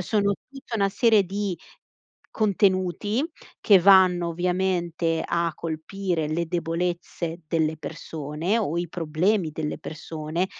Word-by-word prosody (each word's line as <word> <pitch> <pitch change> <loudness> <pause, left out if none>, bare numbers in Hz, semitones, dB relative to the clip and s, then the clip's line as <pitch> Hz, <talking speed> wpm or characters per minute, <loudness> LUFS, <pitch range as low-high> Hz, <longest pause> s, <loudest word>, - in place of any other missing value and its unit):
sono 200 +1 +1 0.2
tutta 270 -4 -8
una 200 -2 +2
serie 215 +1 +4
di 195 -1 -3 0.8
contenuti, 200 +2 +1 0.4
che 205 -4 +7
vanno 180 -2 +6
ovviamente 175 -1 0
a 170 0 0
colpire 165 +1 -3
le 165 +2 0
debolezze 170 0 -3
delle 160 -1 +1
persone, 160 +5 -3
o 170 -7 -1
i 175 0 -2
problemi 170 +3 0
delle 150 0 -3
persone 160 +3 -4
175 Hz, 115 wpm, -25 LUFS, 165-195 Hz, 0.8 s, che